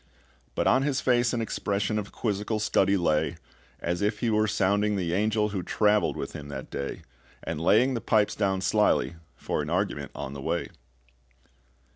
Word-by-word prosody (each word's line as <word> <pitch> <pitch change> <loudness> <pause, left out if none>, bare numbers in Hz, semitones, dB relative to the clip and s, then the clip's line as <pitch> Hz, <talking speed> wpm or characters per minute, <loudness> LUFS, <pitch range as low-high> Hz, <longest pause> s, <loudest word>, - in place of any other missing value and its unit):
But - - 0
on 130 - +4
his 140 -1 0
face 120 -2 +2
an 120 - -1
expression 100 0 -1
Of 100 -1 -6
quizzical 105 0 -2
study 100 -1 +2
lay, 80 -4 +1 0.4
As 85 +2 -2
if 105 +1 +1
he 120 -2 +1
were 110 0 +2
sounding 100 +1 +1
the 90 -3 -1
angel 105 +2 +1
Who 100 -3 -3
traveled 105 +3 +2
with - - -5
him 75 -1 -7
that 70 - -7
day, 70 - -5 0.4
And 80 -1 -4
laying 115 +10 +4
the 115 - -2
pipes 110 -2 +2
down 95 -2 0
slyly 90 - +2 0.2
for - - -2
an 75 - -5
argument 90 -5 -1
on 65 - -5
the 70 - -7
way. - - -2
105 Hz, 175 wpm, -27 LUFS, 90-110 Hz, 0.4 s, on